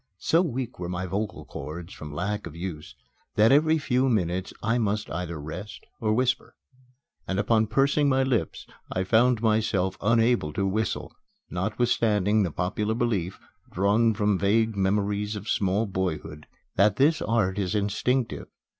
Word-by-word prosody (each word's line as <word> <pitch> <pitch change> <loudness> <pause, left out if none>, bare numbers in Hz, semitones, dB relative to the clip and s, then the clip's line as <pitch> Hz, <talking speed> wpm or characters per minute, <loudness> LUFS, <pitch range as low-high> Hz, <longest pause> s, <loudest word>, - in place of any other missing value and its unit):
So 165 - +2
weak 130 - -3
were 90 -1 -4
my 90 +1 -3
vocal 100 +4 -3
cords 80 +5 -7
from 75 -1 -8
lack 100 +6 -3
of 80 - -10
use 85 -3 -6 0.4
that 110 +3 +5
every 155 +3 +4
few 130 -3 +1
minutes 90 -4 0
I 115 +2 +1
must 105 -1 -1
either 85 -2 -4
rest 85 +8 -8
or 110 -1 0
whisper. 130 +3 0 0.7
And 95 - -1
upon 110 +1 +2
pursing 140 +5 +2
my 135 0 +3
lips 120 - -1 0.3
I 95 - 0
found 115 +3 +3
myself 105 -4 +1
unable 115 -7 +2
to 100 - 0
whistle, 105 +3 -2 0.4
notwithstanding 105 +1 +1
the 95 - +1
popular 105 +6 -1
belief, 105 -7 -1 0.3
drawn 105 +4 +2
from 105 -2 +1
vague 110 +2 +2
memories 100 +2 0
of 105 +1 -7
small 100 +2 +1
boyhood, 80 -6 -4 0.3
that 100 +1 +4
this 150 +4 +3
art 105 -3 +1
is 95 +1 -1
instinctive. 115 +5 -1
105 Hz, 150 wpm, -26 LUFS, 95-115 Hz, 0.7 s, that